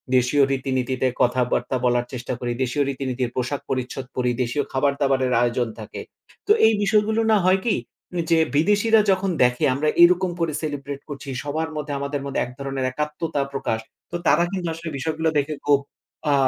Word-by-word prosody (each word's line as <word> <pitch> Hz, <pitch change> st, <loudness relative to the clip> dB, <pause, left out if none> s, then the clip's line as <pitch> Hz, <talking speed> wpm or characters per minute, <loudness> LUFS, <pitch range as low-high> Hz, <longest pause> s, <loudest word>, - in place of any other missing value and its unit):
দেশীয় 130 Hz, +3 st, +4 dB
রীতিনীতিতে 130 Hz, -1 st, 0 dB
কথাবার্তা 125 Hz, +1 st, +1 dB
বলার 120 Hz, 0 st, +2 dB
চেষ্টা 125 Hz, 0 st, -4 dB
করি, 120 Hz, -1 st, -2 dB
দেশীয় 130 Hz, +3 st, 0 dB
রীতিনীতির 130 Hz, -2 st, -2 dB
পোশাক-পরিচ্ছদ 130 Hz, 0 st, -3 dB
পরি। 125 Hz, -1 st, +1 dB
দেশীয় 125 Hz, +4 st, -1 dB
খাবার-দাবারের 135 Hz, -2 st, +1 dB
আয়োজন 120 Hz, 0 st, +1 dB
থাকে। 110 Hz, -, -7 dB, 0.5 s
তো 420 Hz, -, +3 dB, 0.2 s
এই 225 Hz, -, +4 dB
বিষয়গুলো 215 Hz, +2 st, +2 dB
না 215 Hz, -, +6 dB
হয় 190 Hz, +1 st, +4 dB
কি? 235 Hz, -, +2 dB, 0.6 s
যে 165 Hz, -, +6 dB, 0.2 s
বিদেশীরা 210 Hz, +7 st, +4 dB
যখন 190 Hz, +1 st, +1 dB
দেখে 125 Hz, 0 st, +2 dB
আমরা 150 Hz, +3 st, +1 dB
এরকম 180 Hz, +1 st, +5 dB
করে 165 Hz, -3 st, 0 dB
সেলিব্রেট 145 Hz, -2 st, -4 dB
করছি। 140 Hz, -1 st, -7 dB
সবার 155 Hz, +3 st, -2 dB
মধ্যে 150 Hz, -1 st, -4 dB
আমাদের 140 Hz, 0 st, -3 dB
মধ্যে 140 Hz, -, -2 dB
১ 125 Hz, -, -9 dB
ধরনের 135 Hz, -1 st, -2 dB
একাত্মতা 150 Hz, +1 st, -2 dB
প্রকাশ। 115 Hz, -5 st, -1 dB, 0.3 s
তো -, -, -4 dB
তারা 170 Hz, -, +5 dB
কিন্তু 185 Hz, -3 st, -3 dB
আসলে 165 Hz, 0 st, -6 dB
বিষয়গুলো 160 Hz, +3 st, -1 dB
দেখে 145 Hz, +2 st, -2 dB
খুব 145 Hz, -1 st, +5 dB, 0.5 s
আ -, -, +4 dB
140 Hz, 165 wpm, -23 LUFS, 130-160 Hz, 0.6 s, না